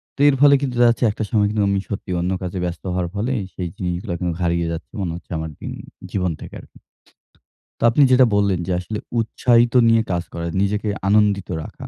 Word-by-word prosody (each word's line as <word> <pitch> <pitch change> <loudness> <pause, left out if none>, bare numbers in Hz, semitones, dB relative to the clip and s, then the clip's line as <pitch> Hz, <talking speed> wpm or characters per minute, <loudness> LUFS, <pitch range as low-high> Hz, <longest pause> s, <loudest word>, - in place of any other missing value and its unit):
তো - - -29
এর 135 - +2
ফলে 145 -1 +7
কিন্তু 130 -3 -2
দেখা 120 - +6
যাচ্ছে 120 +1 +1
একটা 110 - -4
সময় 105 -2 +2
কিন্তু 105 -1 0
আমি 100 0 +1
সত্যিই 95 -3 -4
অন্য 90 +2 -1
কাজে 90 0 -4
ব্যস্ত 85 0 -5
হওয়ার 90 -1 -1
ফলেই 115 +3 -1
সেই 90 - -4
জিনিসগুলা 90 0 -3
কিন্তু 90 -2 -1
হারিয়ে 85 -1 0
যাচ্ছে 85 - -7
মনে 90 -3 -2
হচ্ছে 85 - -12
আমার 80 0 -4
জিন - - -6 0.4
জীবন 90 -3 0
থেকে - - -10
আরকি। - - -19 1.0
তো - - -4
আপনি 135 +5 +4
যেটা 130 0 +6
বললেন 100 -3 +2
যে - - -1
আসলে 105 +4 -5 0.2
উৎসাহিত 120 +1 +2
নিয়ে 115 0 +5
কাজ 85 -1 -1
করা, 85 0 -4 0.2
নিজেকে 105 +2 0 0.2
আনন্দিত 100 -2 +2
রাখা - - -10
100 Hz, 205 wpm, -21 LUFS, 90-115 Hz, 1.0 s, ফলে